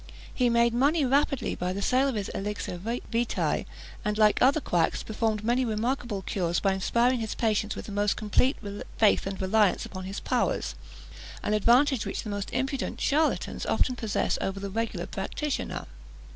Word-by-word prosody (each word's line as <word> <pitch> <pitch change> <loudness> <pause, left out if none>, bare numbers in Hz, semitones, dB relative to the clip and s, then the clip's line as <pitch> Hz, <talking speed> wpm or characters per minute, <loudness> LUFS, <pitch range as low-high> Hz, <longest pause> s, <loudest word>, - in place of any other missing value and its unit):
He 250 -2 +2
made 235 0 +3
money 285 +5 +3
rapidly 275 +1 +1
by 180 +1 -2
the 200 - -4
sale 260 +2 +3
of 265 - -1
his 205 -2 -3
elixir 205 -3 -4
vitæ; 230 +3 -1 0.4
and, 210 0 -1
like 215 -1 +4
other 275 +4 +5
quacks, 175 - 0
performed 220 -1 -1
many 240 +3 +2
remarkable 230 -2 -2
cures 175 -3 -1
by 195 -1 +2
inspiring 235 +6 +2
his 220 -2 -3
patients 215 -2 0
with - - -7
the - - -8
most 205 0 +1
complete 235 +5 +2 0.4
faith 215 -3 +4
and 195 -1 -4
reliance 200 +1 +2
upon 185 -1 -7
his 195 +1 -5
powers; - - 0 0.7
an 210 - 0
advantage 240 +3 +3
which - - -3
the 215 - -5
most 205 0 -3
impudent 265 +1 -2
charlatans 310 +2 +1
often 255 - +1
possess 220 -4 -1
over 195 0 -2
the 200 0 -5
regular 215 -5 -2
practitioner. 275 +9 -3
220 Hz, 170 wpm, -27 LUFS, 200-250 Hz, 0.7 s, other